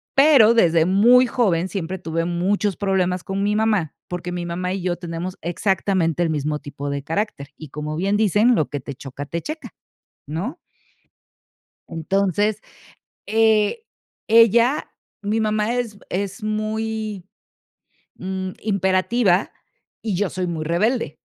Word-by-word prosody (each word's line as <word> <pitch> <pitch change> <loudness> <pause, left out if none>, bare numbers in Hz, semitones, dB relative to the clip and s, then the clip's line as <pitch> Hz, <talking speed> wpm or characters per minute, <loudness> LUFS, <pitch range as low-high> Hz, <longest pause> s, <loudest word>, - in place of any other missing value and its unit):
Pero 270 -6 +7
desde 165 -7 +4
muy 235 +7 +6
joven 190 -8 +1
siempre 190 -1 -4
tuve 165 -1 -2
muchos 190 +3 0
problemas 185 -3 0
con 195 +1 -3
mi 210 +1 +1
mamá, 210 -8 +1
porque 180 0 -5
mi 175 -1 -4
mamá 180 +2 -3
y 195 - -3
yo 180 -1 0
tenemos 175 +1 -5
exactamente 175 -1 0
el 165 - 0
mismo 150 0 -1
tipo 145 0 -6
de 140 -1 -3
carácter. 160 -4 -3
Y 155 - -10
como 150 +2 -5
bien 195 +3 +1
dicen: 215 +3 +4
"Lo 155 - 0
que 145 - -3
te 140 +2 -7
choca 135 +1 -8
te 165 +3 -4
checa", 310 +1 -6 0.6
¿no? 185 - -4 1.3
Entonces, 195 +5 0 0.6
eh, 220 - +2 0.4
ella 230 +5 +4 0.3
mi 210 +2 0
mamá 215 +1 0
es 230 -4 -3
es 195 +2 -3
muy, 215 -2 -3 0.9
mm, 190 0 -4
imperativa, 190 0 +1 0.5
y 215 -4 -2
yo 205 0 0
soy 185 0 -3
muy 165 -3 -3
rebelde 215 +10 0
190 Hz, 140 wpm, -22 LUFS, 170-215 Hz, 1.3 s, Pero